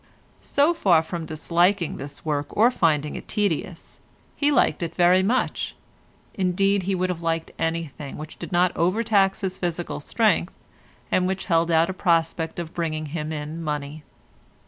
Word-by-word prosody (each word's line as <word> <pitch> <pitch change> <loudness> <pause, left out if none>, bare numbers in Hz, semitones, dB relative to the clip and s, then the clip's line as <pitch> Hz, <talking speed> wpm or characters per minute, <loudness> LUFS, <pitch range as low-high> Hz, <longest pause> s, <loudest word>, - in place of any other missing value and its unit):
So 290 +4 +2
far 175 - +3
from 165 -1 -5
disliking 170 +3 +1
this 140 +3 -9
work 145 -2 -1
or 230 +4 +6
finding 150 - +1
it - - -8
tedious, 195 -4 -2 0.4
he 290 0 +2
liked 280 - +2
it 165 -1 -4
very 180 +1 +5
much, 235 +7 0 0.6
indeed 195 +1 +1
he 195 - +2
would 185 0 0
have 170 -2 -5
liked 165 -1 -1
anything 160 -4 -3
which 155 +1 -9
did - - -7
not 175 0 +2
overtax 195 +2 +2
his 190 -2 -3
physical 175 -2 -3
strength, 195 +2 +1 0.6
and 180 0 +2
which 190 0 -2
held 165 -2 +2
out 165 0 +4
a - - -6
prospect 165 -3 0
of 170 -1 -5
bringing 155 -2 -2
him 155 -2 -3
in 155 +2 -5
money. 150 -1 -4
170 Hz, 160 wpm, -24 LUFS, 160-190 Hz, 0.6 s, or